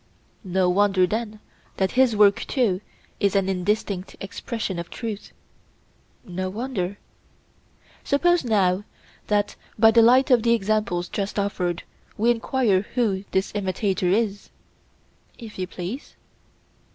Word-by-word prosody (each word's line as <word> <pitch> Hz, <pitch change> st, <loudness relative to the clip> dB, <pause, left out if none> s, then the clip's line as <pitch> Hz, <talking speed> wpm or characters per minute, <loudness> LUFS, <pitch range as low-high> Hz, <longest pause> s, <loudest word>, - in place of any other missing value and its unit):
No 185 Hz, -1 st, +1 dB
wonder, 195 Hz, 0 st, +3 dB
then, 215 Hz, +2 st, -3 dB, 0.4 s
that 190 Hz, -1 st, +1 dB
his 255 Hz, -3 st, +3 dB
work 205 Hz, 0 st, +5 dB
too 210 Hz, -8 st, +1 dB, 0.4 s
is 200 Hz, -1 st, +1 dB
an 195 Hz, -1 st, +2 dB
indistinct 195 Hz, 0 st, -2 dB
expression 195 Hz, -1 st, -4 dB
of 170 Hz, -, -6 dB
truth. 220 Hz, -4 st, -6 dB, 0.9 s
No 185 Hz, +1 st, -4 dB
wonder. 205 Hz, -3 st, -3 dB, 1.1 s
Suppose 350 Hz, +4 st, +2 dB
now 200 Hz, -5 st, +2 dB, 0.4 s
that 205 Hz, -1 st, +1 dB, 0.2 s
by 225 Hz, 0 st, +6 dB
the 230 Hz, +1 st, +6 dB
light 255 Hz, +4 st, +5 dB
of 245 Hz, -2 st, +6 dB
the 235 Hz, +1 st, +3 dB
examples 205 Hz, -4 st, -1 dB
just 200 Hz, +2 st, -4 dB
offered 180 Hz, -4 st, -1 dB, 0.3 s
we 230 Hz, +3 st, +3 dB
enquire 235 Hz, -4 st, +1 dB
who 205 Hz, -6 st, 0 dB
this 190 Hz, +1 st, 0 dB
imitator 190 Hz, -2 st, -1 dB
is? 205 Hz, 0 st, 0 dB, 0.9 s
If 220 Hz, -5 st, -10 dB
you 185 Hz, -, -2 dB
please. 185 Hz, +9 st, -7 dB
205 Hz, 125 wpm, -24 LUFS, 185-230 Hz, 1.1 s, by